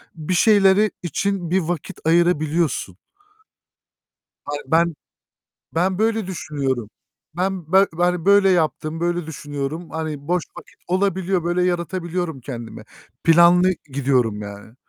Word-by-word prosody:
bir 160 +3 -3
şeyleri 205 +1 +4
için 180 +1 -2
bir 190 +2 +2
vakit 170 -2 -4
ayırabiliyorsun. 165 - +1 1.5
Ay, 145 0 -3
ben 165 +2 +2 0.8
ben 185 +3 +1
böyle 220 -2 +1
düşünüyorum. 135 - -3 0.5
Ben 180 -3 -2
ben 180 -2 +2
böyle 200 -1 +5
yaptım, 160 -2 0
böyle 175 -1 -1
düşünüyorum. 145 +2 -5
Hani, 155 -2 -5
boş 180 -1 +1
vakit - - -15
olabiliyor, 185 -1 0
böyle 175 +1 +1
yaratabiliyorum 175 -3 -2
kendime. 120 -3 -8 0.4
Planlı 175 +2 +6 0.2
gidiyorum 125 -6 +1
yani. 100 +2 -10
170 Hz, 110 wpm, -21 LUFS, 150-185 Hz, 1.5 s, Planlı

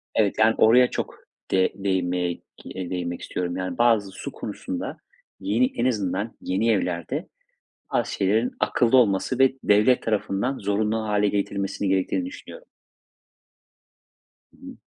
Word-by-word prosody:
evet, 105 -3 +2
yani 110 +1 +5
oraya 125 +3 +6
çok - - -4 0.4
de 95 -1 +3
değinmeye 90 -3 -1
k - - -32 0.3
eee, 95 -2 -6
değinmek 90 -1 -4
istiyorum, 90 0 -3
yani 95 +7 -4
bazı 115 -5 +3
su - - -7
konusunda - - -5 0.4
yeni 105 +6 +2
en 120 - 0
azından 105 -2 -1
yeni 100 +5 0
evlerde 100 - -2 0.7
bazı - - 0
şeylerin 110 +5 +1
akıllı 120 +1 +3
olması 115 +2 +2
ve 135 0 +5
devlet 110 +5 +4
tarafından 110 +4 -1
zorunlu 105 +2 0
hâle 105 0 +2
getirilmesinin 100 -1 -2
gerektiğini 95 - 0
düşünüyorum. - - -10 1.9
Hı - - -24
hı. - - -10
105 Hz, 135 wpm, -24 LUFS, 95-115 Hz, 1.9 s, oraya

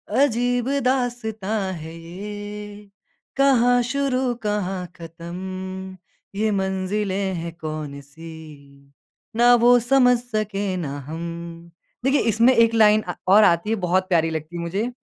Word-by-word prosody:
अजीब 245 -2 +1 0.2
दास्ताँ 220 -6 -1
है 160 -1 -8
ये, 205 +4 -8 0.5
कहाँ 245 -3 +4
शुरू 260 0 0
कहाँ 195 -3 -2
ख़त्म, 185 +3 -7 0.4
ये 215 +2 +1
मंजिलें 190 0 -1
है 170 0 -4
कौन-सी, 150 -2 -9 0.4
ना 240 +1 +6
वो 240 +1 +6
समझ 250 0 +4
सके 210 -5 -3
ना 145 -5 -4
हम। 170 +1 -7 0.3
देखिए, 270 +2 +3
इसमें 230 +3 +4
1 230 0 +4
लाइन 215 -1 +5
अ, 175 - -5
और 205 +3 +7
आती 170 +2 +3
है, 225 - +2
बहुत 185 -1 0
प्यारी 165 -3 +2
लगती 160 +1 -5
है - - -4
मुझे। 195 +8 -2
195 Hz, 125 wpm, -22 LUFS, 170-230 Hz, 0.5 s, और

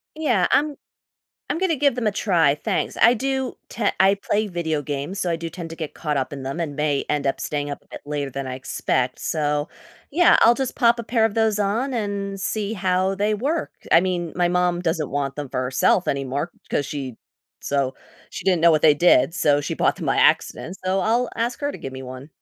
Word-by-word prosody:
Yeah, 245 - +2
I'm 295 0 +2 0.7
I'm - - -1
gonna 360 -4 +1
give 280 -2 +2
them 240 -3 -2
a 210 - +2
try, 170 -9 +2
thanks. - - -2
I 240 - +7
do 265 +1 -2
te 220 -3 -2
I 195 +1 +5
play 210 +2 -1
video 160 -5 -2
games, 145 +7 -4
so 175 - 0
I 165 - 0
do 165 0 -5
tend 170 -1 -8
to 165 - -8
get 160 -3 -6
caught 150 -3 -2
up 130 +1 -2
in 135 - -7
them 135 +6 -4
and 145 -4 -3
may 150 -2 0
end 145 -1 0
up 135 - 0
staying 145 -1 -3
up 145 - -6
a - - -29
bit - - -10
later 145 -2 -3
than 135 +1 -5
I 130 - -4
expect. 130 -1 -1
So, 150 -1 -1 0.4
yeah, 345 +4 +5
I'll 235 +1 +7
just 265 0 -3
pop 235 -2 +4
a - - -3
pair 230 0 +1
of 225 - +1
those 220 -2 +2
on 230 +7 0
and 200 -2 -3
see 215 +2 -2
how 185 0 +1
they 205 +2 0
work. 290 +10 -2 0.2
I 165 - +7
mean, 175 -2 -2
my 175 -1 +2
mom 180 0 +1
doesn't 160 -4 -1
want 140 0 -2
them 145 -2 -5
for 130 - -2
herself 130 +8 +2
anymore, 140 +4 -2 0.2
'cause 145 - 0
she 135 -5 -5 0.4
so, 135 -2 -1 0.3
she - - -8
didn't 180 -4 +2
know 170 0 +6
what 155 -1 +2
they 155 - +7
did, 150 -2 +4
so 145 -4 +2
she - - -3
bought - - +1
them - - -6
by - - +1
accident. 180 +4 +2
So 190 +1 +1
I'll 235 +4 +1
ask 235 +1 -2
her 285 0 -1
to - - -9
give 135 -1 -7
me 130 - -7
one. 130 +2 -9
175 Hz, 230 wpm, -23 LUFS, 145-215 Hz, 0.7 s, I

